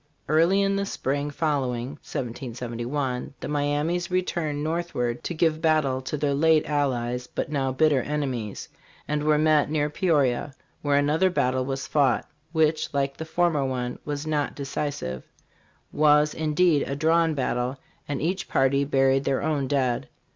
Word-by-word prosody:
Early 170 +6 +4
in 195 0 +1
the 200 - 0
spring 145 -4 -2
following 135 -5 -1
(1771), 125 +2 -4
the - - -5
Miamis 150 +4 0
returned 170 -5 -1
north 170 +2 -2
ward 120 -1 -1
to 175 - -3
give 160 -1 +1
battle 150 -5 +2
to 135 +3 -4
their 145 -1 0
late 155 +2 +4
allies, 125 -4 -1
but - - -4
now 135 -3 0
bitter 145 0 +3
enemies, 130 -8 -3 0.4
and 150 0 -1
were 150 0 +3
met 155 -1 +3
near 150 -1 0
Peoria, 145 -6 +1 0.3
where 145 -1 +2
another 150 +6 +3
battle 130 -7 0
was 135 0 -3
fought, 135 -5 +2 0.2
which, 160 -1 +1
like 140 -1 0
the 160 - -6
former 160 -3 +1
one, 125 -2 -3
was 145 0 -4
not 150 -2 -1
decisive 140 - -4 0.7
was, 150 0 +4
indeed, 155 0 +2
a 140 - -1
drawn 160 +2 +2
battle; 125 -1 -1 0.3
and 145 0 -3
each 185 +4 -1
party 140 +1 +2
buried 135 -1 +2
their 135 0 0
own 145 -3 0
dead. 130 - 0
145 Hz, 155 wpm, -25 LUFS, 130-155 Hz, 0.7 s, Early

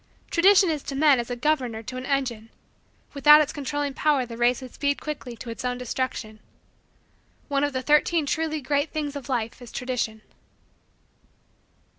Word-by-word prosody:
Tradition 375 0 +5
is 300 -2 -2
to 275 - -6
men 285 -2 +5
as 235 - -4
a 245 - -2
governor 250 -4 -1
to 255 - -7
an 255 +1 -5
engine; 245 -6 -2 0.6
without 295 +1 +7
its 300 -1 0
controlling 290 0 -3
power 285 -2 +1
the 230 -1 -8
race 240 +1 +2
would 255 -2 -10
speed 285 -1 -1
quickly 280 -5 -6
to 230 +1 -8
its 230 - -7
own 250 0 -1
destruction. 245 -3 -4 1.1
One 280 0 +1
of 290 - +1
the 260 0 -2
Thirteen 300 +2 +3
Truly 315 0 -1
Great 285 +3 0
Things 295 -2 -4
of 280 -1 -7
Life 235 -1 -2
is 245 - -11
Tradition. 235 -4 -3
275 Hz, 170 wpm, -25 LUFS, 245-295 Hz, 1.1 s, without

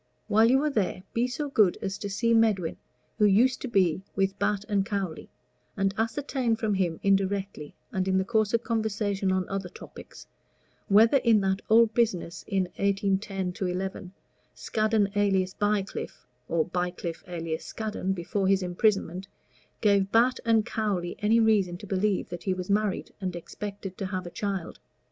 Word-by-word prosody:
While 220 +2 +5
you 265 +3 +4
are 305 - +2
there, 195 -6 -1
be 235 +2 +1
so 290 +4 -3
good 215 -9 +3
as 195 0 -4
to 205 - -4
see 230 +4 +1
Medwin, 215 -7 +2 0.4
who 210 - +5
used 230 +6 +4
to - - -3
be 190 -7 +2
with 195 0 0
Batt 205 -1 0
& 195 - +3
Cowley, 195 -5 -4 0.5
and 195 0 +1
ascertain 235 +1 -1
from 220 -2 -1
him 180 -4 0
indirectly, 195 -4 0 0.2
and 190 0 -1
in 190 0 +2
the 190 - +1
course 215 -1 +1
of 230 0 +1
conversation 205 -4 -1
on 185 -1 0
other 195 -2 -4
topics, - - -12 0.6
whether 225 +6 +6
in 230 -4 +4
that 190 +1 0
old 225 0 +5
business 180 -8 0
in 195 -3 +1
1810 195 -2 -1
11, 185 +1 -4 0.4
Scaddon 215 -2 +1
alias 190 -2 +2
Bycliffe, 205 -1 -2 0.2
or 165 -2 +1
Bycliffe 180 -1 -3
alias 165 -2 -4
Scaddon, 210 -3 -3
before 190 +2 -2
his 195 -1 +3
imprisonment, 185 0 0 0.5
gave 200 -2 +3
Batt 240 +3 +3 0.2
& 215 - +1
Cowley 205 -7 -2
any 220 +2 +3
reason 205 -6 +2
to 205 - -10
believe 195 0 0
that 175 -1 -6
he 190 -2 +1
was 185 +1 -4
married 210 -1 0
and 185 -2 -3
expected 195 +2 -7
to 195 - -2
have 185 -1 -4
a 175 - -7
child. 195 -4 -4
195 Hz, 165 wpm, -27 LUFS, 185-215 Hz, 0.6 s, whether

